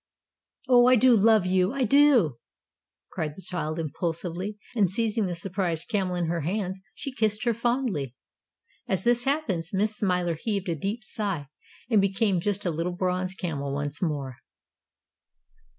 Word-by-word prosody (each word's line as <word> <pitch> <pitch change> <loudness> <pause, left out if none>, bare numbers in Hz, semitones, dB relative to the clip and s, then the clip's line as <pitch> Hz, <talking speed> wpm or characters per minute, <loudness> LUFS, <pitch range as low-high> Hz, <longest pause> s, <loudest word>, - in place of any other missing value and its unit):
"Oh, 245 -1 +6
I 255 - +7
do 250 +1 +6
love 215 -2 +5
you, 185 +3 +2
I 275 -1 0
do!" 250 - +4 0.7
cried 150 -2 -3
the 190 - -11
child, 165 -3 -3
impulsively, 170 +5 -3 0.2
and 200 -5 +3
seizing 220 +1 0
the 175 - -3
surprised 175 -2 -3
Camel 190 -5 0
in 175 -1 0
her 165 0 -1
hands, 190 +3 -2
she 275 - -5
kissed 215 -3 0
her 235 -1 +2
fondly. 230 - -1 0.7
As 190 -1 -1
this 240 0 +2
happened, 270 - 0
Miss 210 +2 0
Smiler 180 -5 0
heaved 200 -4 -2
a 170 - 0
deep 205 +9 -3
sigh, 195 -10 -3 0.4
and 220 -4 +4
became 195 -1 +1
just 205 +3 -1
a 175 - +1
little 165 +3 -2
bronze 185 0 -1
camel 140 -7 -3
once 145 0 -4
more. 140 -7 -2
190 Hz, 155 wpm, -26 LUFS, 170-220 Hz, 0.7 s, I